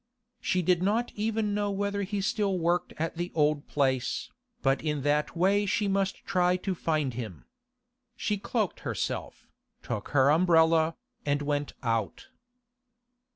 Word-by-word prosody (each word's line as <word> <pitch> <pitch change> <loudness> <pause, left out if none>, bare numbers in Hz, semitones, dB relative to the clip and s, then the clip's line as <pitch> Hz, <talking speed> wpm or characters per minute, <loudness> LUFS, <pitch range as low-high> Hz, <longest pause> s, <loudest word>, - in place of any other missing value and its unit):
She 185 -1 0
did 180 0 +3
not 220 +6 +1
even 215 -1 -1
know 205 0 0
whether 200 0 -1
he 200 +1 -2
still 200 -1 0
worked 175 +1 +1
at 165 +1 -2
the 175 +1 -3
old 150 -2 +2
place, 130 -4 0 0.3
but 135 -1 +2
in 150 -3 -2
that 150 +3 +1
way 200 +3 +3
she 210 0 +1
must 195 -1 -1
try 180 -2 +2
to 190 +1 -2
find 155 -6 -1
him. 110 -7 -7 0.7
She 210 -4 -1
cloaked 210 -1 -1
herself, - - -4 0.4
took 105 - -4
her 140 0 +4
umbrella, 165 -1 +4 0.3
and 145 0 0
went 145 0 -1
out. 115 -4 -2
175 Hz, 145 wpm, -28 LUFS, 145-200 Hz, 0.7 s, her